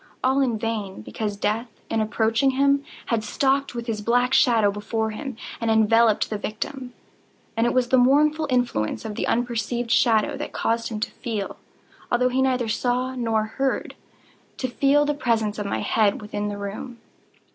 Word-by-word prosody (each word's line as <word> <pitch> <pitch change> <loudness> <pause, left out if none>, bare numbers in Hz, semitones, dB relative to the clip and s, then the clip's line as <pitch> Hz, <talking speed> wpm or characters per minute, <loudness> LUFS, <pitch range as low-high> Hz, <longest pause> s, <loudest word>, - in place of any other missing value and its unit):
All 265 +2 +3
in 240 -4 +1
vain; 210 - -4
because 205 - -4
Death, 215 +4 -1 0.2
in 225 -1 0
approaching 225 +5 +1
him 280 0 +3 0.3
had 220 -2 +1
stalked 270 +4 0
with 235 -1 -4
his 220 -3 -3
black 245 +4 +2
shadow 230 -7 +4
before 220 +2 -2
him, 260 +2 -6 0.2
and 230 - -1
enveloped 220 0 +4
the 215 - -2
victim. 250 +5 -5 0.6
And 230 +1 +2
it - - 0
was 250 -1 +2
the 260 - +5
mournful 300 +4 +3
influence 245 - 0
of 220 - -4
the - - -2
unperceived 235 0 -1
shadow 230 +4 +3
that 295 - -6
caused 230 0 -1
him 220 -2 -4
to - - -2
feel—although 240 +2 -4
he 260 +1 +1
neither 255 -3 +1
saw 250 +3 0
nor 225 -3 0
heard—to 260 +2 -5
feel 280 +4 +3
the 295 - +1
presence 225 -6 0
of 205 - -3
my - - -2
head 210 -3 +2
within 210 -1 -4
the 205 0 -4
room. 210 +5 -6
230 Hz, 170 wpm, -24 LUFS, 215-255 Hz, 0.6 s, the